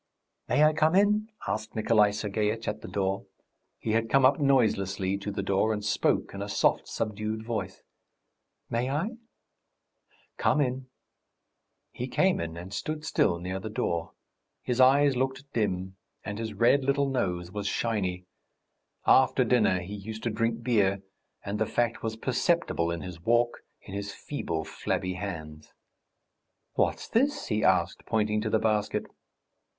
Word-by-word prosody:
"May 150 - +4
I 155 0 +5
come 155 +3 +3
in?" 210 +2 +3 0.2
asked 110 +1 -3
Nikolay 110 -1 +4
Sergeitch 105 +1 -2
at 105 +1 -3
the - - -8
door; 95 0 -2 0.5
he 110 - -3
had 115 +1 +1
come 135 -1 +5
up 135 +3 +5
noiselessly 100 -8 +2
to 100 - -5
the 100 -1 -3
door, 100 +3 +2
and 105 -1 -3
spoke 105 - +1
in 100 - -6
a 100 - -4
soft, 100 - +2
subdued 110 0 -3
voice. 105 -5 -4 0.8
"May 120 +2 -1
I?" 195 - -2 1.2
"Come - - +2
in." 130 -2 -1 1.0
He 125 - -5
came 185 +7 +2
in 85 0 -4
and 90 +3 -8
stood 155 +8 -4
still 85 - +2
near 90 +2 -4
the 110 - -6
door. 85 -6 -2 0.5
His 125 +1 +1
eyes 140 +1 +5
looked 130 +1 -1
dim 95 -4 -1 0.3
and 105 0 -4
his 110 -2 -4
red 120 +6 +4
little 140 +1 +2
nose 90 -8 -1
was 100 0 -3
shiny. 95 -6 -1 0.8
After 130 0 +5
dinner 110 -6 +3
he 95 +4 -7
used 110 +2 -7
to 120 - 0
drink 115 +1 -1
beer, 100 -5 +2 0.4
and 100 +1 -3
the 110 - +1
fact 120 -1 0
was 110 -1 -3
perceptible 130 - 0
in 85 -1 -3
his 85 0 -8
walk, 120 +4 +2 0.2
in 95 - -10
his 100 0 -4
feeble, 85 - -3
flabby 90 +3 -2
hands. 80 -5 -7 1.0
"What's - - 0
this?" 275 +6 +1
he 105 -2 0
asked, - - +2
pointing 105 -1 +1
to 110 - -1
the 110 - +3
basket. 110 -1 0
110 Hz, 155 wpm, -28 LUFS, 100-125 Hz, 1.2 s, I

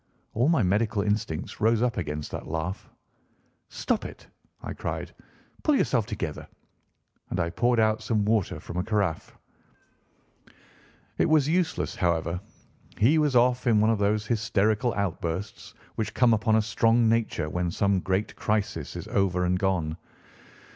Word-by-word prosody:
All 120 +7 +2
my 160 -9 +3
medical 105 +3 +1
instincts 100 -6 -2
rose 115 +1 +3
up 120 -3 +1
against 75 -4 -4
that - - -6
laugh. 80 +5 -4 0.8
"Stop - - -1
it!" - - -9 0.4
I - - -5
cried; - - -5 0.5
"pull 300 - +3
yourself 120 - +1
together!" 90 -9 -5 0.8
and 90 - -2
I 85 -1 0
poured 120 +5 +2
out 110 0 +2
some 110 -1 0
water 110 -3 0
from 85 - -8
a 90 - 0
caraffe. 100 -7 -2 1.8
It - - +3
was 155 -3 +4
useless, 170 +1 0
however. 85 0 0 0.6
He 140 +10 +4
was 150 -4 +1
off 125 +1 +3
in 110 -3 +4
one 110 +2 +4
of 110 - 0
those 105 +1 +1
hysterical 110 +1 +1
outbursts 95 0 -4 0.2
which 110 -1 -4
come 125 -2 +4
upon 110 0 +2
a 110 - +3
strong 115 +2 +3
nature 115 -8 0
when 90 +2 -1
some 100 +2 +1
great 95 +3 -1
crisis 105 -7 -2
is - - -6
over 90 -2 +1
and 90 +1 +1
gone. 85 -5 0
105 Hz, 150 wpm, -26 LUFS, 90-115 Hz, 1.8 s, was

